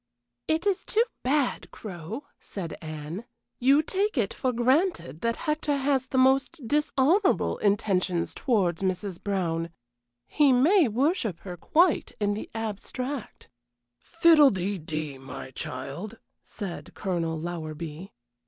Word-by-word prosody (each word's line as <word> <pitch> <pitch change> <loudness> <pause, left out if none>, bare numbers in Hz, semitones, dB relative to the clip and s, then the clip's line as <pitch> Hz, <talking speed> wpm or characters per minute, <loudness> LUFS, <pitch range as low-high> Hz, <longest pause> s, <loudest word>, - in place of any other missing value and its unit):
"It 320 +3 +1
is 400 -3 +1
too 450 +1 +2 0.2
bad, 275 0 0
Crow," 200 - -7 0.2
said 175 -5 -6
Anne. 155 +5 -6 0.4
"You 275 +5 +5
take 400 +2 0
it 210 -5 +1
for 255 - 0
granted 255 - +1
that 230 0 0
Hector 300 -1 0
has 270 -1 +1
the 260 - -2
most 265 +1 +3
dishonorable 300 - +2
intentions 190 -4 +1
towards 195 - +1
Mrs. 185 -1 -2
Brown. 170 -5 -1 0.6
He 295 -3 +3
may 305 +7 +5
worship 235 - 0
her 180 -2 -7
quite 335 - +2
in 205 -1 +1
the 210 - -5
abstract." 225 +4 -5 0.5
"Fiddle 325 - +6
dee 190 -1 -2
dee, 155 -3 -5
my 135 0 -8
child!" 140 - -5 0.3
said 195 -4 -7
Colonel 165 -4 -2
Lowerby. 165 +1 -6
215 Hz, 125 wpm, -27 LUFS, 175-285 Hz, 0.6 s, Fiddle